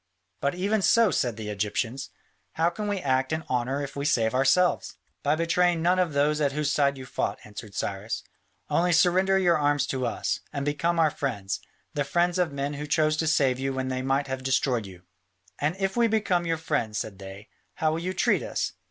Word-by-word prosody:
"But 140 +4 0
even 200 +4 +1
so," 225 +1 +4
said 120 -4 0
the 105 -1 -5
Egyptians, 110 +6 -2 0.4
"how 165 +2 +2
can 210 +2 -4
we 205 -1 0
act 130 -5 0
in 160 0 -1
honour 130 +3 -1
if 140 - -7
we 140 - -3
save 115 -6 +2
ourselves?" 135 +8 +2 0.3
"By 145 +1 +2
betraying 170 +1 +2
none 180 +2 +3
of 175 -4 +1
those 150 +2 +2
at 140 -2 +1
whose 150 -1 0
side 140 -1 +2
you 130 - -8
fought," - - -2
answered 105 0 -10
Cyrus: 100 +3 -3 0.4
"only 175 +1 +2
surrender 185 +3 +4
your 175 -4 +3
arms 145 -1 +2
to 130 -2 -1
us, 115 - -2
and 140 -2 -3
become 170 +4 0
our 160 -2 +4
friends, 105 -10 -3 0.3
the 145 - 0
friends 175 +5 +1
of 175 -4 +1
men 140 +1 -3
who 150 +1 -5
chose 155 0 +2
to 160 - 0
save 135 -5 +2
you 135 0 -1
when 130 0 -2
they 130 0 -2
might 135 +2 +1
have 130 -1 -4
destroyed 130 -4 +1
you." 90 -2 -13 0.6
"And 150 +4 0
if 195 0 -1
we 235 -1 +4
become 195 -6 +1
your 165 0 +1
friends," 110 -9 -1
said 100 -4 -5
they, 95 +2 -10 0.3
"how 155 -1 +1
will 160 - -1
you 185 +2 -2
treat - - +2
us?" - - -2
145 Hz, 210 wpm, -26 LUFS, 130-170 Hz, 0.6 s, so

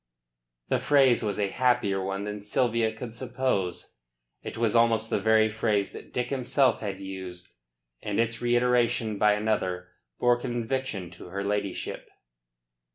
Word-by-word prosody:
The - - +2
phrase 135 -4 +4
was 105 -3 -2
a 100 -2 0
happier 100 -5 +1
one 95 +1 -3
than 105 0 -5
Sylvia 115 +1 +1
could 110 +1 -8
suppose. 120 - -2 0.4
It - - -7
was 115 -1 +1
almost 115 -1 +3
the - - +2
very 110 +1 +4
phrase 105 -2 0
that - - -11
Dick 125 +2 -2
himself 135 0 +2
had 100 -3 -4
used; 95 -2 -8 0.5
and 105 0 -2
its 115 0 0
reiteration 120 -3 +2
by 105 0 +5
another 95 -4 -1 0.3
bore 120 0 +3
conviction 120 -6 -3
to 85 - -11
her 100 +3 -4
ladyship. 100 -1 -3
110 Hz, 145 wpm, -27 LUFS, 100-120 Hz, 0.5 s, by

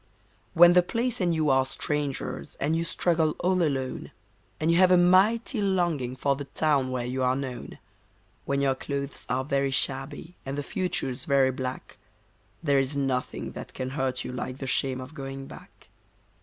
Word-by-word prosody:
When 175 +1 +8
the 180 - +7
place 230 +5 -2
and 175 -1 +2
you 155 -3 +2
are 130 0 +4
strangers 145 +2 -3
and 150 +3 0
you 165 - 0
struggle 165 -2 +1
all 185 0 +2
alone, 135 -5 -1 0.5
And 160 +1 +2
you 170 - +3
have 185 0 +6
a 180 - +6
mighty 205 +7 +4
longing 175 -10 0
for 140 +2 +1
the 140 +1 -6
town 140 -2 +1
where 125 -1 -2
you 130 +2 -2
are 130 0 +2
known; 130 -2 -6 0.7
When 140 0 0
your 135 -1 +3
clothes 140 +1 -5
are 130 +1 0
very 140 -1 +1
shabby 140 +5 -1
and 135 +1 -5
the 145 - -2
future's 180 - -2
very 135 -2 +3
black, 130 -3 -6 0.6
There 140 -3 +3
is 135 +2 0
nothing 135 -2 -2
that - - -9
can 130 0 -4
hurt 135 -2 -1
you - - -5
like 125 +1 -5
the 135 - -6
shame 130 0 0
of 130 +4 -9
going 135 -2 -6
back. - - -14
140 Hz, 180 wpm, -27 LUFS, 130-170 Hz, 0.7 s, When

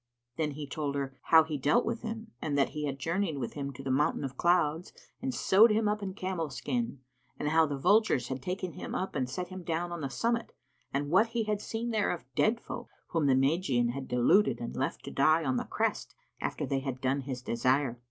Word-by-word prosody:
Then 155 -2 -1
he 150 +1 -6
told 140 0 -3
her 135 -1 -3
how 160 -1 +7
he 155 -2 -4
dealt 150 - +3
with 230 0 -2
him, 225 -1 -6
in 150 -2 -1
that 140 -1 +3
he 150 0 -4
had 135 -1 -3
journeyed 165 +2 -1
with 120 -4 -4
him 140 -1 -4
to 135 - -9
the 135 - -1
Mountain 150 +4 +1
of 135 -1 -4
Clouds 170 0 +2 0.3
and 130 - -1
sewed 190 - +5
him 215 0 +2
up 210 0 0
in 200 - -3
the 190 - -9
camel's 175 -8 -3
skin, 235 - -2 0.4
and 150 - -1
how 160 0 +4
the 145 -1 -3
vultures 180 - +3
had 130 -1 -3
taken 180 +1 -3
him - - -6
up 190 - -2
and 130 -3 -1
set 180 +6 -4
him 185 0 -7
down 170 +1 -2
on 170 -1 -4
the 140 - -2
summit 230 - -1 0.4
and 145 +2 -2
what 195 +6 +5
he 230 - +2
had 210 -1 -1
seen 230 +2 -3
there 215 -2 +1
of 165 -8 -3
dead 225 - +2
folk, - - -7 0.2
whom 165 -4 +1
the 135 - +5
Magian 135 -3 +2
had 135 +2 -4
deluded 125 - +3
and 120 - -5
left 135 - -2
to - - -6
die 155 +4 +4
on 130 -2 +1
the - - -2
crest - - -2 0.2
after - - -2
they 135 - 0
had 135 -2 -4
done 135 +2 0
his 130 -2 -5
desire. 125 +1 +1
150 Hz, 235 wpm, -30 LUFS, 135-190 Hz, 0.4 s, how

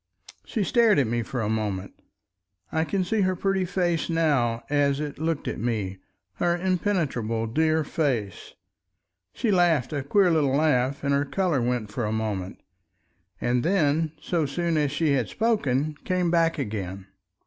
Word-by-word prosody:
She 220 - -1
stared 230 0 +4
at 140 - +3
me 120 +1 -1
for 120 +2 -4
a 105 - -1
moment. 105 -3 -2 0.8
I 160 0 +1
can 190 +2 0
see 210 +4 0
her 185 -1 +1
pretty 195 0 0
face 175 -2 0
now 140 -9 +1
as 140 -1 +1
it 150 -2 -5
looked 160 -1 -2
at - - -3
me—her 100 - -3
impenetrable 165 - -1
dear 155 +6 +1
face. 130 - -2 0.8
She 225 - -1
laughed 170 -7 +2
a 145 - -1
queer 180 +7 +3
little 145 -4 +2
laugh 140 -3 +1
and 140 0 +1
her 140 0 +2
color 150 -1 0
went 120 -3 -1
for 120 +1 -2
a 105 - -1
moment, 105 -4 -3 0.8
and 120 0 +1
then 160 -3 +1
so 160 -1 -1
soon 170 +4 -1
as 150 -2 +1
she 150 +1 +1
had 130 -5 +1
spoken, 155 - 0
came 180 -2 0
back 165 -1 +2
again. 100 -7 -4
145 Hz, 160 wpm, -25 LUFS, 120-175 Hz, 0.8 s, stared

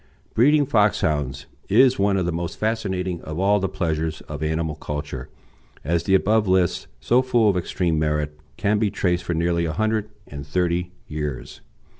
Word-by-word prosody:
Breeding 145 +5 +4
Foxhounds 75 - +1 0.2
is 125 +4 +5
one 100 0 +2
of 95 - 0
the 85 - 0
most 85 0 -4
fascinating 95 -5 -2
of 80 0 -6
all 100 +3 +3
the 95 -1 -1
pleasures 80 -4 -2
of 75 0 -8
animal 80 0 -1
culture, 75 -4 -6 0.5
as 85 +3 0
the 95 - +4
above 105 +2 +2
list, 95 -2 +1
so 120 - +3
full 120 -4 +2
of - - -5
extreme 85 -2 0
merit, 75 -1 -1 0.2
can 105 +1 +1
be 105 -2 +2
traced 90 -3 0
for 85 -1 -2
nearly 85 +1 +1
a 80 - -2
hundred 110 +2 0 0.2
and 70 -1 -8
thirty 90 +3 -1 0.2
years. 75 -4 -5
90 Hz, 170 wpm, -23 LUFS, 80-105 Hz, 0.5 s, is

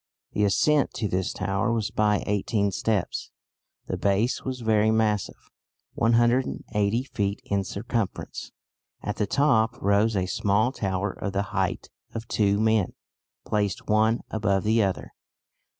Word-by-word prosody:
"The 105 - +1
ascent 145 - +2
to 110 - -1
this 95 -1 -1
tower 95 +4 -1
was 110 -2 -1
by 105 -1 +2
eighteen 100 0 0
steps; 105 -1 -1 0.6
the 95 - -3
base 100 +6 +1
was 130 -1 -4
very 110 -1 +3
massive, 110 -2 +1 0.6
180 115 -2 +1
feet 100 -6 -2
in 100 -1 0
circumference. 100 +1 -4 0.5
At 105 - -3
the 105 - 0
top 125 -3 +2
rose 105 +1 +2
a 95 -2 +1
small 105 +5 +1
tower 95 -5 -2
of 100 +1 -5
the 100 0 +1
height - - -1 0.2
of 115 0 -5
two 100 -2 +2
men 110 -3 +2 0.5
placed 105 -3 -1
one 110 +2 +3
above 100 -3 +1
the 110 +1 +3
other. 95 -2 -2
105 Hz, 135 wpm, -26 LUFS, 100-115 Hz, 0.6 s, very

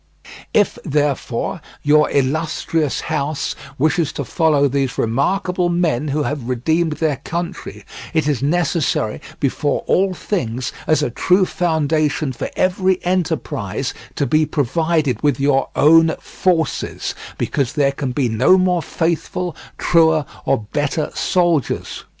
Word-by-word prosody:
If, 205 - +2
therefore, 145 0 -1 0.2
your 150 +1 +4
illustrious 155 +2 0
house 145 +1 -2 0.2
wishes 155 +2 +1
to 140 - -4
follow 150 -3 +2
these 135 -2 -1
remarkable 180 - 0
men 165 -5 0
who 150 +1 0
have 140 -4 -3
redeemed 160 +6 +1
their 150 -2 0
country, 170 +5 -5 0.3
it 160 -2 +1
is 145 -5 0
necessary 155 -7 0 0.2
before 145 +1 0
all 190 0 +2
things, 125 - -2 0.2
as 155 -1 +3
a 125 - -1
true 185 +9 +3
foundation 155 -4 0
for - - -4
every 185 0 +2
enterprise, 175 -3 -1 0.2
to 140 - 0
be 155 +2 +3
provided 150 -3 0
with 145 -3 +1
your 135 -1 +2
own 160 +2 +5
forces, 165 -6 -1 0.2
because 140 -1 -1
there 140 -3 +2
can 140 -2 -3
be 125 0 0
no 120 +11 +4
more 180 -2 +2
faithful, 170 +2 -2 0.2
truer, 160 -3 +3 0.2
or 105 - +1
better 150 +1 -1
soldiers. 175 - 0
155 Hz, 125 wpm, -19 LUFS, 140-170 Hz, 0.3 s, own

